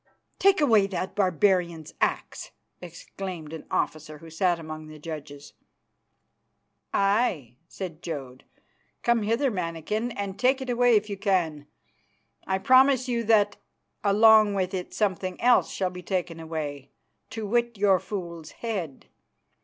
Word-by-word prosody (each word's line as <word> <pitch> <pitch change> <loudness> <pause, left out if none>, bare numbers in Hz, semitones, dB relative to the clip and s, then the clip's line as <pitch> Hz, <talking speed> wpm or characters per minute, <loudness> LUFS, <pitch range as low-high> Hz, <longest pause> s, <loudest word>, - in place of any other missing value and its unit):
"Take 390 -1 +4
away 220 -9 +4
that 190 -1 -4
barbarian's 180 -3 +1
axe," - - -2 0.3
exclaimed 170 -1 -8
an 160 - -8
officer 155 0 -2
who 165 +2 -13
sat 175 +1 +1
among 155 -1 -8
the 155 0 -11
judges. 150 -2 -8 1.4
"Aye," 195 - +1
said 175 -4 -7
Jodd, 135 -6 -7 0.6
"come 235 -1 +3
hither, 230 +6 +1
mannikin, 180 +5 -3
and 200 -1 -5
take 260 +2 +3
it 260 -2 -3
away 245 -1 +4
if 210 0 +2
you 200 -2 -5
can. 175 -7 0 0.8
I 190 - +1
promise 260 +4 +4
you 235 -2 -1
that 205 -2 +3 0.5
along 215 0 +6
with 185 -1 -1
it 185 -1 -4
something 185 -3 -2
else 245 0 +4
shall 185 -2 -2
be 180 0 -8
taken 180 -3 -3
away, 150 -4 -5 0.4
to 225 -1 -5
wit 235 +1 0
your 195 -2 +4
fool's 170 -5 -6
head. 190 - -5
190 Hz, 135 wpm, -26 LUFS, 165-220 Hz, 1.4 s, along